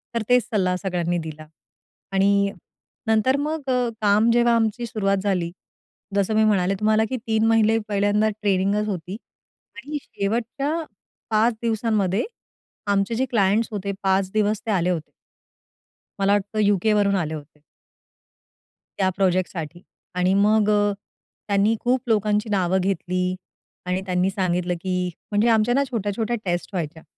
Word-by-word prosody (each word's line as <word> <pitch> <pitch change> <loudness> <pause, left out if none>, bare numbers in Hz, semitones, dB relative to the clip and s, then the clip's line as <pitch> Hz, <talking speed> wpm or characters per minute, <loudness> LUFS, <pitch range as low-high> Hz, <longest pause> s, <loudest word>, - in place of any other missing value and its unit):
तर 230 - +1
तेच 250 -1 +5
सल्ला 185 -5 +1
सगळ्यांनी 175 -2 -1
दिला. 155 -2 -7 0.7
आणि 200 +1 +3 0.6
नंतर 220 +4 +3
मग 295 -1 -3
अ, 250 -2 +1
काम 210 +2 +4
जेव्हा 240 0 +4
आमची 230 +1 0
सुरुवात 200 -4 0
झाली, 180 -4 0 0.6
जसं 200 +2 +1
मी 220 - +4
म्हणाले 195 -3 +2
तुम्हाला, 215 +1 +3
की 260 - -2
3 220 0 +2
महिने 225 0 +4
पहिल्यांदा 205 +1 +2
ट्रेनिंगच 200 +1 +1
होती 185 -1 -4 0.6
आणि 285 +3 -5
शेवटच्या 240 +8 -2 0.6
5 225 +2 +3
दिवसांमध्ये 220 -4 0 0.7
आमचे 200 +3 +1
जे 260 +3 +1
क्लायंट्स 220 -2 +2
होते, 200 -1 -3
5 190 0 +1
दिवस 215 0 +1
ते 220 - -1
आले 180 -2 +1
होते. 165 -4 -3 1.1
मला 195 +1 +3
वाटतं 205 +1 -1
युके 205 0 +3
वरून 200 -1 +2
आले 160 -4 -1
होते. 150 -1 -10 1.3
त्या 190 -1 +2
प्रोजेक्टसाठी. 175 -3 -1 0.3
आणि 180 +1 +2
मग 210 +1 +3
अ, 205 -1 +3 0.5
त्यांनी 205 +2 +2
खूप 250 +1 +1
लोकांची 210 -1 +1
नावं 190 -2 +1
घेतली 185 -1 -1 0.5
आणि 180 +1 -1
त्यांनी 180 0 +1
सांगितलं, 180 -2 -1
की 180 -1 -1 0.2
म्हणजे 210 +3 +2
आमच्या 225 +2 +3
ना 280 - +3
छोट्या-छोट्या 220 +1 -1
टेस्ट 175 -1 -2
व्हायच्या. 160 -2 -4
205 Hz, 140 wpm, -23 LUFS, 185-220 Hz, 1.3 s, तेच